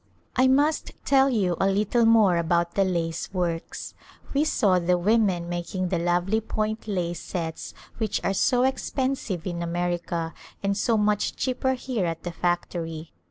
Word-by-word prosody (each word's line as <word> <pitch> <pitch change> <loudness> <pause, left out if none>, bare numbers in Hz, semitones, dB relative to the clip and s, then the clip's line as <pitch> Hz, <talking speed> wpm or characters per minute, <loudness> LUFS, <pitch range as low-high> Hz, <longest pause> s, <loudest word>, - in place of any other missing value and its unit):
I 255 +1 +4
must 290 +4 +2
tell 270 -1 +5
you 195 -8 +1
a 195 - +4
little 210 +4 +2
more 220 -6 +5
about 170 +1 +1
the 195 - +3
lace 170 -3 -2
works. 175 -3 -3 0.4
We 285 +2 +3
saw 205 -11 +3
the 180 +1 +2
women 190 -2 +2
making 175 +1 -3
the 175 -2 0
lovely 175 +5 +1
point 215 0 -3
lace 175 -4 -2
sets 165 -3 -5 0.2
which 220 -3 0
are 195 - +1
so 245 +5 +2
expensive 260 - -1
in 175 -2 -3
America 170 -1 -2 0.3
and 200 0 +1
so 225 +2 +1
much 210 0 +1
cheaper 260 0 0
here 245 -7 -2
at 165 0 -4
the 175 - -4
factory. 170 -2 -2
185 Hz, 160 wpm, -25 LUFS, 175-225 Hz, 0.4 s, tell